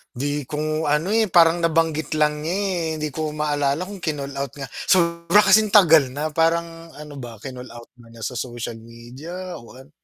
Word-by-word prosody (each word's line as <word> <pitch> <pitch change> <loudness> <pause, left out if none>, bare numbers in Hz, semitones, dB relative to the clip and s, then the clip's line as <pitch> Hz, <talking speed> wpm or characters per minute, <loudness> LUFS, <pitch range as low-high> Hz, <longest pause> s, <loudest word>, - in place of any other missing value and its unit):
'Di 145 +1 -3
ko 155 +2 -2
ano, 150 +6 +1
eh, 225 0 +3
parang 170 -2 +5
nabanggit 160 -2 0
lang 150 -1 +1
niya, 160 +4 -3
eh, 190 -4 -1
hindi 155 -1 -3
ko 155 +1 -4
maalala 145 0 0
kung 200 +2 -7
kinol-out 140 -5 -4
nga, 135 -4 -8 0.2
sobra 170 +2 +3
kasing 210 +1 +4
tagal 165 -8 +7
na, 150 +2 -2
parang 165 +1 -1
ano 150 -1 -10
ba 120 -3 -8
kinol-out 125 -3 -10
nga 115 -1 -17
niya 115 - -12
sa 125 +1 -4
social 120 -2 -5
media 130 +11 -9
o 120 +1 -15
ano. 135 +3 -15
155 Hz, 180 wpm, -22 LUFS, 140-170 Hz, 0.2 s, tagal